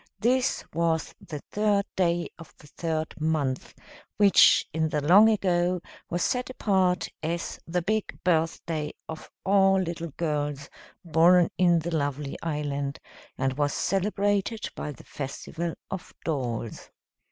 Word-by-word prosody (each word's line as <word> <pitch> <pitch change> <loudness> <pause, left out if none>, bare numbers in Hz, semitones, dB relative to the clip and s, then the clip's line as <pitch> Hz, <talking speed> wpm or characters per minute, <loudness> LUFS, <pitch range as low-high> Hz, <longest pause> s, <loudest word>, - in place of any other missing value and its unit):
This 255 +2 +1
was 165 0 0
the 150 - -7
third 205 -1 +2
day 175 -2 +1
of 165 - -13
the - - -17
third 160 +1 -3
month, 150 -5 -1 0.4
which 205 -2 +6
in 160 0 +1
the 150 - 0
long 190 +9 +7
ago 180 -4 +1 0.3
was 175 0 -1
set 250 -1 0
apart 190 -7 +1
as 170 +2 -3
the 175 +1 -1
big 215 +3 -1
birthday 160 -2 0
of 160 -1 -8 0.2
all 195 0 +4
little 170 -2 -3
girls 145 -3 -2 0.3
born 170 +2 +5
in 175 -2 +5
the 165 +1 -2
lovely 145 -1 -2
island, 145 -2 -2 0.4
and 135 +1 -1
was 145 -1 +1
celebrated 205 +2 0
by 150 - -4
the 145 - -13
Festival 160 +4 -5 0.2
of 190 -2 -6
Dolls. 120 -7 -3
170 Hz, 130 wpm, -27 LUFS, 150-190 Hz, 0.4 s, long